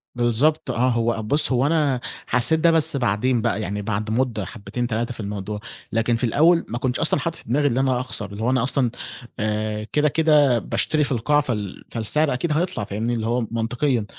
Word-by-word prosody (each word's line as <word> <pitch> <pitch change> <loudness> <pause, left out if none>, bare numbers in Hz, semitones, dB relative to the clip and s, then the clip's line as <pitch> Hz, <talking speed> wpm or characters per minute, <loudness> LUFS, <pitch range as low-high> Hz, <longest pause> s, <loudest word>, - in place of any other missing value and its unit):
بالضبط 120 +6 +2
آه، 125 +2 +1
هو 115 -2 0
بُص، 145 +7 +5
هو 125 +1 +2
أنا 145 -4 +1 0.3
حسّيت 125 +6 +2
ده 170 +1 +4
بس 160 -2 +3
بعدين 120 +1 +1
بقى، 110 - -1
يعني 105 +1 -3
بعد 110 +1 -3
مدة 115 -4 -1
حبّتين، 115 +4 -5
3 120 +1 -2
في - - -12
الموضوع، 105 0 -5 0.3
لكن 115 +1 +1
في 115 - -3
الأول 165 +8 +3
ما 120 - -4
كنتش 125 0 -2
أصلًا - - +2
حاطط 165 +5 -3
في - - -6
دماغي 145 +3 +2
إن 125 - 0
أنا 130 -2 +1
أخسر، 105 -5 -3
اللي 105 +2 -6
هو 125 - +1
أنا 130 -3 +1
أصلًا 125 -2 +1 0.5
آآ 105 0 -2
كده، 150 0 +3
كده 145 -5 +3
باشتري 155 +6 0
في 140 - -2
القاع، 145 +5 +2
فال 105 -8 -4
فالسعر 135 +6 +1
أكيد 150 +6 -2
هيطلع، 160 - -1
فاهمني، 110 +4 -3
اللي 110 -1 -2
هو 120 +2 0
منطقيًا. 115 +1 -1
120 Hz, 205 wpm, -22 LUFS, 110-145 Hz, 0.5 s, بُص